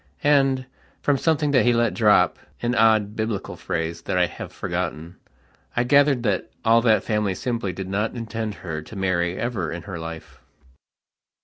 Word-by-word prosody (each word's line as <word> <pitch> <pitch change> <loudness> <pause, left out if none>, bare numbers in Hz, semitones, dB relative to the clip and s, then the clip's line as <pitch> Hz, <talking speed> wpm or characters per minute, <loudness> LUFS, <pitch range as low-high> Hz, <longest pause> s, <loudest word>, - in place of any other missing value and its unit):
And, 135 -3 +3 0.4
from 140 -2 +2
something 155 -3 +1
that 130 -3 +4
he 120 - +4
let 120 -2 +2
dropan 105 +2 +2
odd 110 -2 +3
Biblical 110 -2 -3
phrase 85 0 -3
that 90 - -2
I 90 - +4
have - - -8
forgottenI 85 -1 -4 0.7
gathered 140 -1 +4
that 100 -5 0 0.2
all 115 +1 +5
that 110 -2 +3
family 105 -3 0
simply 115 -3 -2
did 95 +1 -6
not 105 +5 -1
intend 110 -2 -4
her 80 -2 -3
to 80 - -12
marry 90 -2 0
ever 110 -9 -2
in 85 0 -6
her 95 -5 -6
life. 80 0 -8
105 Hz, 155 wpm, -23 LUFS, 90-120 Hz, 0.7 s, all